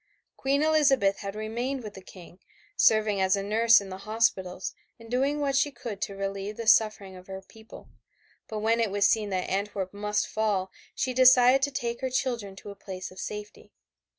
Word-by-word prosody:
Queen 280 +2 0
Elizabeth 275 -10 +3
had 200 0 -6
remained 240 +5 -3
with 210 -1 -8
the 190 - -11
King, 180 -1 -14 0.4
serving 215 -2 +3
as 190 0 +3
a 200 - -3
nurse 225 +3 +5
in 200 -1 -9
the 185 0 -7
hospitals 195 -4 -1 0.3
and 230 0 -13
doing 275 +4 +1
what 280 -2 0
she 280 +2 +3
could 235 -6 -8
to 200 - -3
relieve 195 +1 -4
the 230 - -5
suffering 215 -3 +3
of 185 0 -13
her 190 0 -7
people, 220 +2 -15 0.6
but 220 - -5
when 225 +2 +2
it 225 -2 +1
was 200 +1 +3
seen 215 -1 +1
that 185 -2 -2
Antwerp 195 -1 -3
must 210 +1 -1
fall 205 -4 -1 0.2
she 260 -1 -1
decided 255 +1 +6
to 280 - +1
take 235 -2 -4
her 260 - -1
children 240 -6 -2
to 200 +1 -10
a - - -11
place 185 -2 -8
of 185 - -12
safety. 210 0 -8
215 Hz, 195 wpm, -27 LUFS, 195-245 Hz, 0.6 s, decided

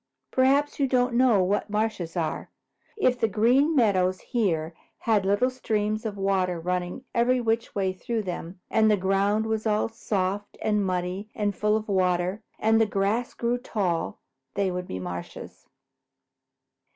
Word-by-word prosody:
Perhaps 275 +3 +2
you 275 - +3
don't 250 -1 +2
know 235 -6 +4
what 200 +3 0
marshes 210 -5 -2
are. 165 -2 -2 0.5
If 255 - +2
the 225 - +3
Green 245 - +3
Meadows 185 -7 +3
here 170 -9 -1 0.2
had 210 -4 +1
little 205 +6 +2
streams 215 -3 -1
of 205 -2 -6
water 190 -3 0
running 180 +7 -3
every 250 +2 +3
which 230 -1 -1
way 190 -2 0
through 220 +4 -3
them, 180 -1 -6
and 220 -1 +4
the 210 - +4
ground 200 +3 +1
was 220 0 -1
all 215 +1 +1
soft 205 -2 -2
and 210 -1 +1
muddy 185 +2 -2
and 205 -2 -1
full 210 0 +2
of 220 - -6
water, 185 0 +1 0.2
and 225 +1 +3
the 220 - +3
grass 205 +4 -1
grew 240 +1 0
tall, 190 -9 -2 0.4
they 195 -2 +1
would 180 0 -4
be - - -5
marshes." 90 -1 -7
210 Hz, 155 wpm, -26 LUFS, 185-225 Hz, 0.5 s, know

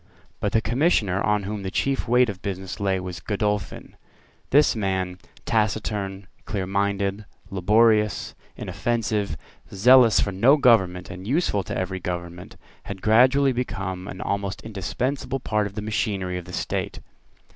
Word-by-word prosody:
But 105 - -1
the 110 - +3
Commissioner 110 - +1
on 105 -1 +1
whom 105 +1 -4
the 95 - -4
chief 135 +7 -1
weight 125 +1 +4
of 100 -4 -6
business 95 0 -5
lay 95 -2 0
was 90 -2 -6
Godolphin. 105 0 -3 0.5
This 145 -1 +4
man, 95 -3 -2 0.3
taciturn, 105 -3 -1 0.2
clearminded, 100 +1 -1 0.3
laborious, 105 +3 +2 0.2
inoffensive, 110 -7 -2 0.3
zealous 120 +2 +6
for 100 - +1
no 120 +10 +5
government 95 -9 +3
and 95 +1 -8
useful 135 - +1
to - - -4
every 95 0 -3
government, 85 0 -6 0.3
had 100 -1 -7
gradually 130 +5 +4
become 95 -7 -4
an 95 - -7
almost 100 -1 -3
indispensable 125 +6 -3
part 105 -4 0
of 100 - -12
the 105 - -4
machinery 100 -4 -2
of 90 - -10
the 90 - -10
state. - - -3
100 Hz, 140 wpm, -24 LUFS, 95-115 Hz, 0.5 s, zealous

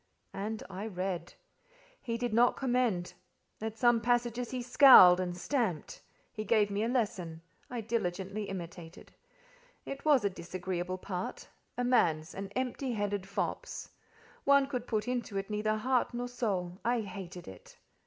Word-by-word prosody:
And 210 +3 -4
I 195 +3 -6
read. 185 -3 -4 0.7
He 230 -2 -3
did 240 -2 -2
not 240 +2 +4
commend; 245 -9 0 0.5
at 220 0 -4
some 240 -1 +4
passages 240 0 0
he 255 -1 -4
scowled 245 -8 +9
and 180 -1 -2
stamped. 195 - -2 0.3
He 215 - -4
gave 210 -1 +2
me 205 +2 0
a - - +1
lesson: 180 -9 -2 0.3
I 245 -2 -4
diligently 205 -2 -2
imitated. 175 -2 -8 0.7
It 275 - -6
was 290 -8 +4
a - - +3
disagreeable 180 0 -4
part—a 185 +6 -6
man's—an 195 -5 +1
empty 255 0 -2
headed 205 -2 -2
fop's. 360 - -4 0.5
One 280 0 +5
could 250 -3 -4
put 215 0 -1
into 245 -5 -2
it 195 +2 -4
neither 215 +1 0
heart 250 +2 0
nor 245 +1 -2
soul: 195 -7 -2
I 240 0 +1
hated 185 -3 -8
it. 95 -1 -13
215 Hz, 145 wpm, -31 LUFS, 185-245 Hz, 0.7 s, scowled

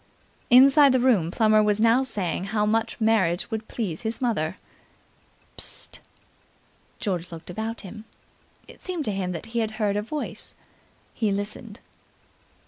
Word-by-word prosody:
Inside 270 +2 +7
the 260 - +3
room 230 -10 +3
Plummer 215 +2 +3
was 210 0 +2
now 230 +3 +4
saying 195 -8 -1
how 210 +1 0
much 220 +1 0
the 225 - -3
marriage 195 -3 +1
would 220 0 -4
please 190 -9 -4
his 225 0 -3
mother. 205 -9 -1 1.0
"Psst!" - - -2 1.0
George 180 -4 -3
looked 165 +1 -9
about 220 +4 -4
him. 215 +2 -10 0.6
It - - -15
seemed 355 -5 -3
to - - 0
him 190 -2 -2
that 170 +2 -5
he 235 - +1
had 220 -1 -1
heard 205 -2 0
a 205 - 0
voice. 290 +8 -6 0.6
He 215 -3 0
listened. 205 +2 -5
215 Hz, 150 wpm, -25 LUFS, 195-235 Hz, 1.0 s, Inside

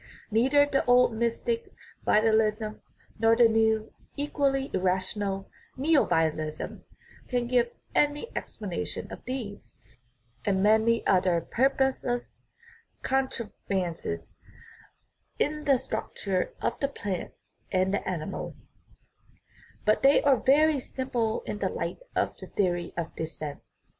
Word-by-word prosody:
Neither 265 +6 +5
the 280 -1 +1
old 245 -1 +5
mystic 235 - -1 0.3
vitalism 215 0 +2 0.4
nor 225 0 +5
the 235 0 +7
new, 220 -1 +2 0.2
equally 275 -1 0
irrational, 190 +1 -1 0.3
neovitalism 160 - +1 0.5
can 245 -2 0
give 240 -1 +2 0.2
any 295 +9 +1
explanation - - -4
of - - -10
these 240 -6 -6 0.7
and 190 -2 +1
many 220 +2 +4
other 180 -2 +3
purposeless 260 - 0 0.6
contrivances 195 - -2 1.0
in 300 +1 -1
the 275 -3 +5
structure 195 -6 -3
of - - -1
the 275 - +1
plant 205 -9 -5 0.4
and 185 0 +2
the 200 - -1
animal; 165 -4 -4 1.3
but 215 - +3
they 275 +1 +5
are 275 -2 +5
very 295 +4 +4
simple 250 - -2
in - - -4
the - - 0
light - - -4 0.2
of - - 0
the - - -9
theory 175 -3 0
of 165 -1 -4
descent. 155 -2 -5
225 Hz, 110 wpm, -28 LUFS, 190-265 Hz, 1.3 s, the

